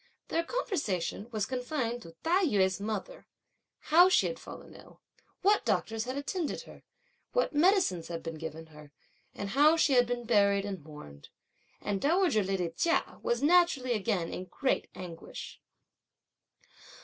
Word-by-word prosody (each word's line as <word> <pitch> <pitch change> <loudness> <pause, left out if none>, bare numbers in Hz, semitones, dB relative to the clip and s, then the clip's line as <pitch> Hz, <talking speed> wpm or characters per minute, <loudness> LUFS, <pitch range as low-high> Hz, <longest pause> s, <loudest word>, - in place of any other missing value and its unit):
Their 335 - 0
conversation 290 - -2
was 215 -4 -1
confined 250 -2 -3
to 165 -5 -13
Tai 360 +3 +3
yü's 190 - +2
mother, 220 - -5 0.7
how 355 +3 +8
she - - +4
had - - -3
fallen - - -11
ill, - - -16 0.4
what 410 +2 +4
doctors 225 0 -1
had 255 +2 -4
attended 305 +3 -3
her, - - -14 0.5
what - - +1
medicines 310 - +3
had 170 -1 -6
been 165 -1 -6
given 160 0 -7
her, 150 -1 -14 0.4
and 200 - -4
how 295 +8 +5
she 295 -3 +3
had 245 -1 +5
been 245 0 -2
buried 200 -3 +3
and 190 -6 -5
mourned; 110 - -12 0.5
and 200 -1 -2
dowager 325 - +3
lady 190 -3 -1
Chia 335 - 0
was 240 +3 -1
naturally 300 -6 +4
again 200 -5 -1
in 185 - -5
great 265 +7 -1
anguish. 175 -3 -9
230 Hz, 150 wpm, -30 LUFS, 185-315 Hz, 0.7 s, how